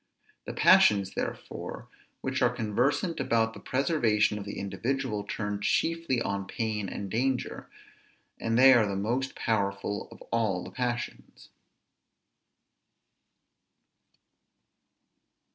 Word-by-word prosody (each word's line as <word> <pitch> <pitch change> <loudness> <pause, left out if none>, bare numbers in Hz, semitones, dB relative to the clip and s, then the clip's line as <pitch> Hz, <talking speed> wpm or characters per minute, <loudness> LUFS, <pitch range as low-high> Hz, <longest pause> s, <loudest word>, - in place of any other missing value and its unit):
The - - -5
passions 100 -2 +5
therefore - - -5 0.3
which 130 0 -2
are 125 - +5
conversant 125 - 0
about 115 -4 +1
the - - -10
preservation 120 -7 +1
of 100 - -7
the 100 - -6
individual 115 +2 -2
turn 105 0 -3
chiefly 165 0 +1
on 100 -4 -2
pain 105 -3 -2
and 100 - -5
danger, 125 +6 -2 0.7
and 115 0 0
they 130 +1 +8
are 115 -4 +4
the 100 - -2
most 120 +7 -1
powerful 100 -2 -1
of - - -12
all 105 -6 0
the - - -9
passions. 120 -2 -4
115 Hz, 110 wpm, -28 LUFS, 105-130 Hz, 0.7 s, they